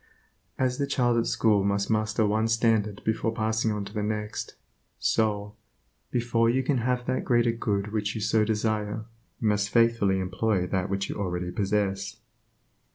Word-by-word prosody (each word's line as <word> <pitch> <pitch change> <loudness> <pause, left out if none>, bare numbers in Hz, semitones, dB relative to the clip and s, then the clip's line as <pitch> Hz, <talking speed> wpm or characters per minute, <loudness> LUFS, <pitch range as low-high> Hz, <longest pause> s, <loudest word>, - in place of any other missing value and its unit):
As 130 0 0
the 140 - 0
child 120 -4 +2
at 115 - 0
school 105 -3 +2
must 100 0 0
master 110 0 +1
one 110 +2 +1
standard 110 -3 +1
before 110 0 0
passing 110 0 0
onto 100 -1 -4
the 105 - -2
next, 105 0 -3 0.4
so, 105 -2 0 0.6
before 115 -1 +1
you 130 +3 +1
can 135 -1 +1
have 125 +1 0
that 130 0 -1
greater 120 -1 +3
good 105 -3 -2
which 105 -2 -2
you - - -2
so 105 +1 +2
desire, 105 0 -1 0.3
must 105 -2 +1
you - - -19
faithfully 115 -5 +3
employ 95 +1 0
that 95 +1 -1
which 100 0 -1
you - - -5
already 90 -3 -2
possess. 100 +1 -1
110 Hz, 160 wpm, -27 LUFS, 100-115 Hz, 0.6 s, greater